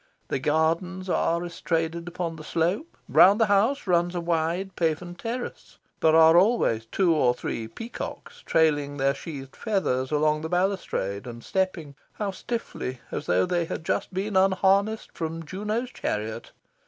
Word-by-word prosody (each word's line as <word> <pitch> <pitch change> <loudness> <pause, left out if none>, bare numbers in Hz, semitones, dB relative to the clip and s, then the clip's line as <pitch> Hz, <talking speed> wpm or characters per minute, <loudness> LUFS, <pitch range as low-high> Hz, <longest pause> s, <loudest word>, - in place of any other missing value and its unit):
The - - 0
gardens 165 +6 0
are 170 +1 +1
estraded 170 0 -2
upon 175 -1 -3
the 155 - -10
slope. 175 - -1
Round 200 +4 +6
the 225 - +5
house 215 +7 +2
runs 175 -1 +2
a - - 0
wide 170 +3 -1
paven 170 +1 -1
terrace. 235 +7 -6 0.2
There 160 0 +4
are 160 0 +7
always 175 - +3
two 175 - +2
or 125 -6 +3
three 115 -2 -4
peacocks 460 - -8
trailing 145 -3 +2
their 135 0 +2
sheathed 140 -2 -8
feathers 130 - 0
along 150 0 +2
the 160 - -4
balustrade, 175 - -1
and 120 -1 -8
stepping 185 -6 -2 0.2
how 205 -2 -3
stiffly! 190 - -5
as - - -4
though 90 +1 +3
they 175 -1 0
had 160 - -5
just - - -1
been 195 +2 -3
unharnessed 195 +3 +3
from 165 -1 -5
Juno's 210 +8 -3
chariot. 110 +2 -4
170 Hz, 155 wpm, -26 LUFS, 155-195 Hz, 0.2 s, are